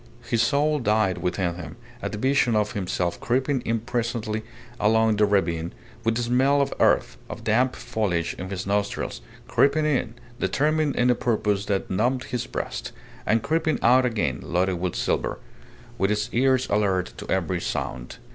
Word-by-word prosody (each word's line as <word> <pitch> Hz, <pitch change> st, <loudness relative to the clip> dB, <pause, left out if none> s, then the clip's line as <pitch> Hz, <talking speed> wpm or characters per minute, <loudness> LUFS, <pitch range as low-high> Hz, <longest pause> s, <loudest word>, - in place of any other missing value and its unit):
His 115 Hz, -, +1 dB
soul 145 Hz, +5 st, +2 dB
died 105 Hz, -5 st, +1 dB
within 90 Hz, -1 st, -1 dB
him 85 Hz, -2 st, -8 dB, 0.3 s
at -, -, -3 dB
the 105 Hz, -, -4 dB
vision 130 Hz, -1 st, +2 dB
of 105 Hz, -1 st, +1 dB
himself 90 Hz, -3 st, -2 dB
creeping 130 Hz, +2 st, 0 dB
in 115 Hz, -1 st, -1 dB
presently 115 Hz, -2 st, -2 dB, 0.4 s
along 110 Hz, 0 st, +3 dB
the 105 Hz, 0 st, +4 dB
ravine, 85 Hz, -4 st, 0 dB, 0.3 s
with 115 Hz, -1 st, +1 dB
the 120 Hz, -, 0 dB
smell 130 Hz, +4 st, +3 dB
of 140 Hz, -, +1 dB
earth, -, -, +3 dB
of -, -, -7 dB
damp 125 Hz, +4 st, +2 dB
foliage 105 Hz, -9 st, -1 dB
in 95 Hz, +1 st, -5 dB
his 95 Hz, -2 st, -4 dB
nostrils 100 Hz, -7 st, -1 dB, 0.3 s
creeping 150 Hz, +2 st, +3 dB
in, 125 Hz, -6 st, 0 dB, 0.2 s
determined 155 Hz, 0 st, +1 dB
in 125 Hz, 0 st, +3 dB
a -, -, +5 dB
purpose 105 Hz, -4 st, 0 dB
that 100 Hz, -2 st, -1 dB
numbed 125 Hz, +7 st, +1 dB
his 125 Hz, -2 st, -4 dB
breast, -, -, -4 dB, 0.4 s
and 110 Hz, +2 st, +2 dB
creeping 160 Hz, +2 st, +1 dB
out 125 Hz, +2 st, +6 dB
again 105 Hz, -, 0 dB
loaded 90 Hz, 0 st, 0 dB
with 90 Hz, -1 st, -2 dB
silver, -, -, -1 dB, 0.6 s
with 95 Hz, +1 st, +2 dB
his 105 Hz, 0 st, 0 dB
ears 130 Hz, +1 st, +3 dB
alert 95 Hz, -9 st, +1 dB
to -, -, -9 dB
every 90 Hz, -1 st, 0 dB
sound. 65 Hz, -6 st, -4 dB
110 Hz, 165 wpm, -25 LUFS, 95-125 Hz, 0.6 s, out